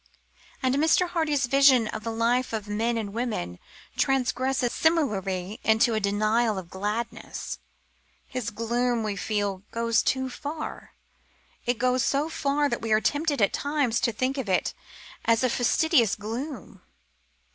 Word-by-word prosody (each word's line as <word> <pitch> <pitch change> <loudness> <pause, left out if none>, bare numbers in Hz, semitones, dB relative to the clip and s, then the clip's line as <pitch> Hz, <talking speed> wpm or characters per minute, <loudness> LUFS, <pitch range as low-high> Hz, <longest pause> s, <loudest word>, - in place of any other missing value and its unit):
And 260 0 +2
Mr. 320 +4 +3
Hardy's 300 -6 +1
vision 265 -3 +5
of 215 - -5
the 230 - -3
life 235 +2 +1
of 215 -2 -3
men 225 +3 0
and 205 -3 -4
women 215 - -3 0.4
transgresses 265 -1 +1
similarly 205 - 0
into 220 +2 +3
a 220 - +1
denial 215 +2 +1
of 180 -2 -7
gladness. 210 +4 -4 0.7
His 250 -3 -4
gloom, 235 +1 0
we 210 -2 -2
feel, 205 -2 -2
goes 230 0 +1
too 260 0 0
far. 295 +4 -7 0.7
It 245 -1 +1
goes 250 +1 +2
so 285 +3 +1
far 290 -1 +1
that - - -2
we 225 - -3
are 215 - +5
tempted 290 -1 +1
at 200 - +2
times 285 -5 0
to 235 - +1
think 255 +5 -1
of 235 -7 -4
it 185 - +1 0.5
as 230 +1 +3
a 255 - +3
factitious 245 - +3
gloom. 230 - -6
235 Hz, 145 wpm, -26 LUFS, 215-270 Hz, 0.7 s, vision